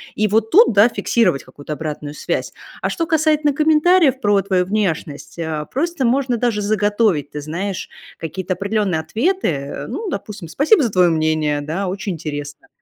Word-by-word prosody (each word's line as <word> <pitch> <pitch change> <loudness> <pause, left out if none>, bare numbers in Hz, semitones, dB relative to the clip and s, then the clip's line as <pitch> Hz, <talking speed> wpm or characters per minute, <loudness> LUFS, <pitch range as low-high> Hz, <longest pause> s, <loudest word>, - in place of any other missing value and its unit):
И 215 - +1
вот 220 +2 +1
тут, 420 - +6
да, 205 +4 +6
фиксировать 230 - +1
какую-то 145 +1 -8
обратную 150 -1 -5
связь. - - -2 0.3
А - - 0
что 335 - -2
касательно 310 -2 +2
комментариев 310 -1 +3
про 205 -1 +3
твою 190 -2 +1
внешность, 180 -8 -3
э, 160 -2 -3
просто 320 0 -1
можно 250 0 +1
даже 230 -3 0
заготовить, 205 -6 +1
ты 150 - -5
знаешь, 180 +6 -4 0.3
какие-то 185 +3 -4
определенные 200 -3 -1
ответы, 315 - 0
э. 140 -3 -4
Ну, 395 - -4
допустим: 200 - -6
"Спасибо 290 - +3
за 240 - +1
твое 180 -3 +4
мнение",- 155 -2 +1
да,- 165 +7 -3
"Очень 195 +1 -3
интересно",- 145 -2 -7
200 Hz, 165 wpm, -19 LUFS, 160-250 Hz, 0.3 s, тут